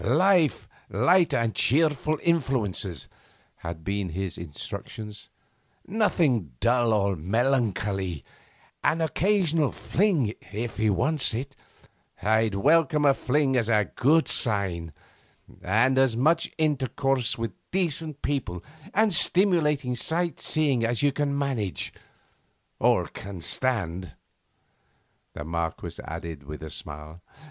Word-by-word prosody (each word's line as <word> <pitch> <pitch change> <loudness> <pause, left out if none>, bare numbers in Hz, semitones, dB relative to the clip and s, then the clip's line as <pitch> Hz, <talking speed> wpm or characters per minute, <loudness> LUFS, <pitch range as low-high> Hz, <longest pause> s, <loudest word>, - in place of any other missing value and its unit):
'Life, 180 -6 +3 0.2
light 170 - +3
and 115 -2 0
cheerful 155 +2 +2
influences,' 115 - -1 0.5
had 85 -1 -7
been 100 0 -2
his 95 +1 -4
instructions, 105 +6 -8 0.6
'nothing 155 - +1
dull 120 -1 +2
or 100 -2 +1
melancholy; 100 - -1 0.6
an 165 - +2
occasional 165 -2 +1
fling, 165 - 0 0.2
if 115 +3 -4
he 110 0 +2
wants 135 - +2
it 140 +4 -5 0.6
I'd 110 +1 +1
welcome 155 - +3
a 140 - +6
fling 135 0 +1
as 120 -3 +1
a 105 -3 +2
good 155 +5 +3
sign 95 -7 +1 0.7
and 120 +8 +2
as 130 -4 +2
much 160 +6 +2
intercourse 135 -4 0
with 115 -2 -3 0.2
decent 160 -5 -2
people, 125 -12 -2 0.3
and 215 -1 +3
stimulating 155 -8 +3
sight 170 +6 -1
seeing 140 -6 +1
as 120 +3 0
you 145 - +4
can 140 0 -1
manage 115 - -2 0.9
or - - +3
can 100 -2 -9
stand,' 90 - -1 1.2
the - - -6
Marquess 80 0 -4
added 80 -1 -6
with 75 +2 -9
a 80 - -7
smile. 75 +3 -8
120 Hz, 115 wpm, -26 LUFS, 95-150 Hz, 1.2 s, a